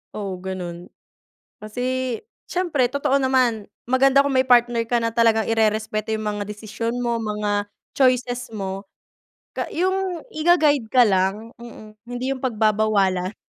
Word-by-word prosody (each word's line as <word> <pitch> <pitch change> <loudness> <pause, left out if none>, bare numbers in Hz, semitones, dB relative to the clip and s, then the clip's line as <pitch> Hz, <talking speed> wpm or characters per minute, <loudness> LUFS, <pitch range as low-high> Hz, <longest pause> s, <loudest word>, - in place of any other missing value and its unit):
Oo, 195 -3 -5
gano'n. 180 -2 -6 0.7
Kasi, 250 +3 -2 0.3
siyempre 335 -8 0
totoo 275 +1 0
naman, 255 -5 +1 0.2
maganda 270 +2 +4
kung 280 - -1
may 260 0 +2
partner 240 -1 +4
ka 240 - +1
na 230 - 0
talagang 225 -1 +3
irerespeto 220 -1 0
yung 215 - -5
mga 210 -1 -2
desisyon 220 +2 -4
mo, 235 -1 0
mga 210 -2 -2 0.2
choices 250 -2 +1
mo, 195 -1 -5 0.6
ka - - -4
yung 370 -1 -1
iga-guide 310 -6 +3
ka 250 +2 +5
lang, 195 +2 0
mm, 215 -2 -12
hindi 245 +2 -3
yung 270 - -3
pagbabawalan. 215 -5 +1
230 Hz, 135 wpm, -22 LUFS, 210-260 Hz, 0.7 s, ka